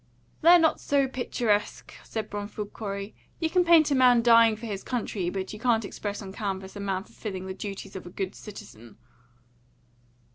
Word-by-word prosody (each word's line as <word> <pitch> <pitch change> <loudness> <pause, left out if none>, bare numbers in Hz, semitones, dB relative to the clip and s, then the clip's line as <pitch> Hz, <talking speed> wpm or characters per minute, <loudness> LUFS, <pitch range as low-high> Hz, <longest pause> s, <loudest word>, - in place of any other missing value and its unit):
"They're 340 +2 +8
not 325 -2 +3
so 280 -1 +1
picturesque," 240 -5 -1
said 220 -2 -5
Bromfield 205 0 -5
Corey. 200 -1 -5 0.3
"You 320 -1 -1
can 365 -1 +4
paint 330 -3 +5
a - - +4
man 250 -3 +5
dying 230 -1 +6
for 225 +2 -9
his 200 -3 -5
country, 215 -7 -2
but 190 +1 -4
you 210 - -8
can't 225 -2 +2
express 205 +1 -5
on 190 -1 -8
canvas 195 -2 -4
a - - -6
man 195 -1 -2
fulfilling 190 -3 -7
the 190 - -5
duties 195 0 -7
of 185 - -7
a - - -7
good 190 +1 -4
citizen." 120 - -12
210 Hz, 180 wpm, -27 LUFS, 195-245 Hz, 0.3 s, They're